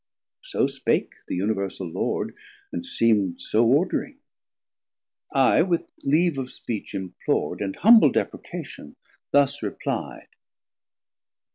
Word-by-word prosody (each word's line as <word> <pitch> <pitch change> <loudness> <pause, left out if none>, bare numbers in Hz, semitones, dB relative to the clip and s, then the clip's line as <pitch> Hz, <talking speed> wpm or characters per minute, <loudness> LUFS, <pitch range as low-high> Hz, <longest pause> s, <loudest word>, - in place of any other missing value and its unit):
So - - 0
spake - - -1
the - - -3
Universal 100 -1 -2
Lord, - - -2 0.4
and 85 - -4
seem'd 105 -6 +1
So 110 +2 +2
ordering. 175 - +1 1.1
I 135 +2 +4
with 170 -1 +1 0.2
leave 155 +1 +2
of 130 -1 -5
speech 110 -4 -5
implor'd, 95 +1 -2
And 100 -1 -2
humble 220 - +7
deprecation 75 - -5 0.3
thus 145 0 +3
repli'd. 105 -5 -4
125 Hz, 105 wpm, -24 LUFS, 100-150 Hz, 1.1 s, humble